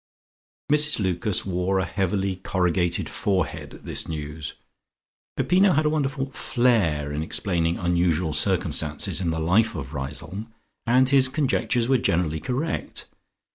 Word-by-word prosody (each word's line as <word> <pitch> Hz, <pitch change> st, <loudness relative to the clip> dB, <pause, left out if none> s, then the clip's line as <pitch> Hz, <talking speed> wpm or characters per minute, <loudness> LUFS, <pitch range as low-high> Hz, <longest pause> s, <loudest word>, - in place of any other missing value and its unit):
_" -, -, +7 dB
Mrs 150 Hz, 0 st, +3 dB
Lucas 95 Hz, 0 st, 0 dB
wore 95 Hz, 0 st, 0 dB
a 95 Hz, -, +1 dB
heavily 95 Hz, -1 st, -1 dB
corrugated 90 Hz, -2 st, 0 dB
forehead 95 Hz, -5 st, -2 dB
at -, -, -16 dB
this -, -, -1 dB
news. 75 Hz, -1 st, -5 dB, 0.8 s
Peppino 190 Hz, +1 st, +4 dB
had 155 Hz, +1 st, +2 dB
a 150 Hz, -, +2 dB
wonderful 135 Hz, -3 st, -1 dB
flair 105 Hz, -, +1 dB
in 75 Hz, -, -2 dB
explaining 85 Hz, 0 st, 0 dB
unusual 85 Hz, -2 st, +1 dB
circumstances 75 Hz, +3 st, 0 dB
in 85 Hz, -, 0 dB
the 80 Hz, 0 st, -1 dB
life 105 Hz, +8 st, +2 dB
of 70 Hz, +1 st, -6 dB
Riseholme 75 Hz, +11 st, -5 dB, 0.4 s
and 130 Hz, +2 st, +4 dB
his 135 Hz, -1 st, +5 dB
conjectures 130 Hz, -4 st, 0 dB
were 130 Hz, -1 st, +3 dB
generally 85 Hz, -6 st, 0 dB
correct. 130 Hz, -, -3 dB
95 Hz, 135 wpm, -24 LUFS, 80-125 Hz, 0.8 s, _"